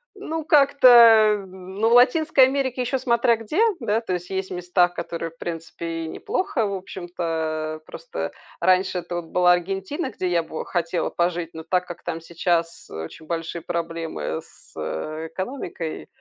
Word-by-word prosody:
ну 325 -5 -4
как-то, 235 -8 +6
ну 190 +4 -2
в - - +3
Латинской 260 +2 +6
Америке 260 -2 -1
еще 255 +2 -1
смотря 235 -2 +3
где, 225 - -1 0.2
да. 225 -2 0
То 190 -6 -3
есть, 180 0 -4
есть 190 0 -3
места, 180 0 +2
которые, 170 -1 -5
в 165 - -26
принципе, 165 0 -5
и - - -5
неплохо, 380 - -1
в 200 - -2
общем-то. 165 -4 -4
Просто - - -6 0.3
раньше 185 0 +2
это 175 - -6
вот 175 -1 -3
была 180 +2 +4
Аргентина, 195 - -2
где 185 - -2
я 170 -1 +2
бы 160 0 -6
хотела 170 0 -1
пожить. 170 -1 -1
Но 160 0 -7
так 180 +2 0
как 175 - -9
там 165 -1 -3
сейчас 170 0 -1
очень 80 - -8
большие 165 +1 -4
проблемы 165 - -3
с - - -22 0.6
экономикой 180 - -5
180 Hz, 155 wpm, -23 LUFS, 165-235 Hz, 0.6 s, как-то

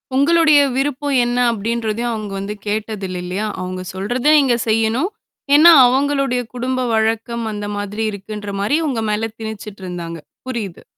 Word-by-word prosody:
உங்களுடைய 305 +1 +5 0.2
விருப்பம் 280 +1 -1
என்ன 240 +1 -1
அப்டின்றதையும் 230 +1 -2
அவங்க 215 -2 -5
வந்து 200 +2 -4
கேட்டதில்ல 205 -3 -3
இல்லையா? 190 +4 -3 0.2
அவங்க 185 0 -5
சொல்றத 240 +7 -3
நீங்க 265 -4 +3
செய்யணும்? 225 - +1 0.5
ஏன்னா, 325 +4 +9 0.2
அவங்களுடைய 275 -1 +1
குடும்ப 255 +1 -2
வழக்கம் 225 +1 0
அந்த 205 0 -5
மாதிரி 205 +2 -3
இருக்குன்ற 205 0 -7
மாரி 215 +9 +2
உங்க 240 -5 -1
மேல 225 +2 -1
திணிச்சுட்டு 210 -3 -7
இருந்தாங்க. 170 -2 -6 0.3
புரியுது. 220 -9 -5
225 Hz, 135 wpm, -19 LUFS, 205-255 Hz, 0.5 s, ஏன்னா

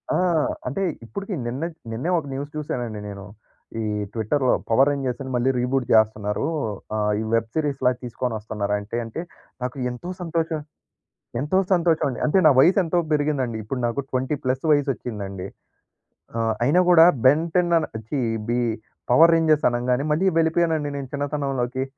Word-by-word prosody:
ఆ! - - +3 0.5
అంటే 140 +10 -2 0.2
ఇప్పుడికీ, 200 - -6
నిన్నట్ 155 +7 -4 0.2
నిన్నే 125 +10 -3
ఒక 160 - -2
న్యూస్ 140 +2 -5
చూసానండి 120 -7 -4
నేను, 100 -1 -8 0.6
ఈ - - -2 0.3
ట్విట్టర్‌లో. 125 +4 +1 0.2
పవర్ 130 +5 +5
రేంజర్స్‌ని 135 -1 -3
మళ్ళీ 125 +2 +2
రీబూట్ 125 +1 0
జేస్తనారు. 110 +3 +2 0.5
ఆహ్, 105 0 +1
ఈ - - -2
వెబ్ 115 0 +1
సీరీస్‌లా 140 -5 +1
తీసుకోనొస్తున్నారంటే 110 -3 -3
అంటే, 115 +8 -5 0.4
నాకు 125 +2 -4
ఎంతో 150 +10 -6
సంతోషం 165 -2 -1 0.8
ఎంతో 150 +8 0 0.2
సంతోషవండి. 165 -7 +1
అంటే, 155 - +2
నా - - +9
వయసెంతో 175 +2 +4
బెరిగిందండి. 145 -6 0
ఇప్పుడు 125 +5 -4
నాకు 120 +4 -2
20 130 +3 0
ప్లస్సు 130 +3 -1
వయసొచ్చిందండి. 110 -10 -1 0.9
ఆహ్, 115 -1 +1
అయినా 150 +8 +4
కూడా, 165 -2 +8 0.2
బెంటె‌న్ 170 +5 +3 0.4
ఛీ 140 +1 -1 0.3
బీ 120 +1 +1 0.5
పవర్ 165 +7 +7
రేంజర్స్ 155 -2 +3
అనంగానే, 125 +2 0
మళ్ళీ 160 +6 +2
వెళిపోయానండి 160 -2 +1
నేను 140 -2 -5
చిన్నతనంలోకి. 135 -3 -2
135 Hz, 135 wpm, -23 LUFS, 120-155 Hz, 0.9 s, నా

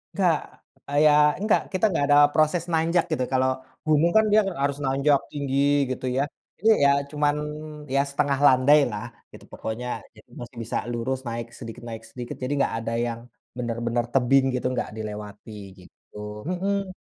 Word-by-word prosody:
Nggak, 175 -6 +3 0.5
eee, 145 - -1
ya 150 - +7 0.3
nggak, 215 - +3
kita 185 +3 +2
nggak 145 -5 +1
ada 145 - +6 0.2
proses 155 +2 +2
nanjak 165 +2 +2
gitu, 140 -5 0
kalau 130 0 +3 0.4
umum 155 +3 +4
kan 220 - +5
dia 215 - +6 0.2
harus 140 0 0
nanjak 135 +2 +3
tinggi 140 -2 -2 0.3
gitu 130 0 -4
ya, 135 - +3 0.4
ini 220 - +3 0.2
ya 140 - +6 0.2
cuman 145 0 +1 0.6
ya 140 - +4
setengah 140 -1 0
landailah 130 -4 +4 0.3
gitu - - -14
pokoknya, 115 +3 -5 0.3
jadi - - -19
masih 120 +1 -10
bisa 115 - -3
lurus 125 +2 -2
naik 115 0 -4
sedikit 115 -1 -9
naik 115 0 -7
sedikit, 120 0 -7
jadi 130 - -1
nggak - - +1
ada 115 0 -3
yang 115 -1 -4 0.4
benar-benar 120 0 -1
tebing 135 +1 +4
gitu 125 - -3 0.2
gak - - -7
dilewati, 105 -1 -7 0.3
gitu. 90 - -20 0.3
Mhm. 195 +1 -1
135 Hz, 160 wpm, -25 LUFS, 120-150 Hz, 0.6 s, ya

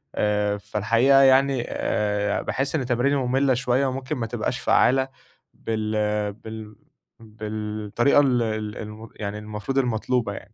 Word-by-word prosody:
آآ، 105 -1 +1
فالحقيقة 115 +7 +3
يعني 135 -1 +4
آآ، 105 -1 -1
باحس 135 +3 -2
إن 135 -5 -1
تماريني 125 +3 +1
مُمّلة 135 0 +2
شوية 125 +2 +1
وممكن 130 +2 -3
ما 115 - -2
تبقاش - - -3
فعالة 130 +1 +3 0.5
بال 110 -1 -3 0.4
بال 110 0 -9 0.4
بالطريقة 110 +3 -1
ال 130 -4 +2
ال 110 -1 -3
الم 110 +1 -8
يعني 105 0 -5
المفروض 105 +5 -5
المطلوبة 120 -3 0
يعني. 105 - -11
115 Hz, 130 wpm, -24 LUFS, 105-130 Hz, 0.5 s, يعني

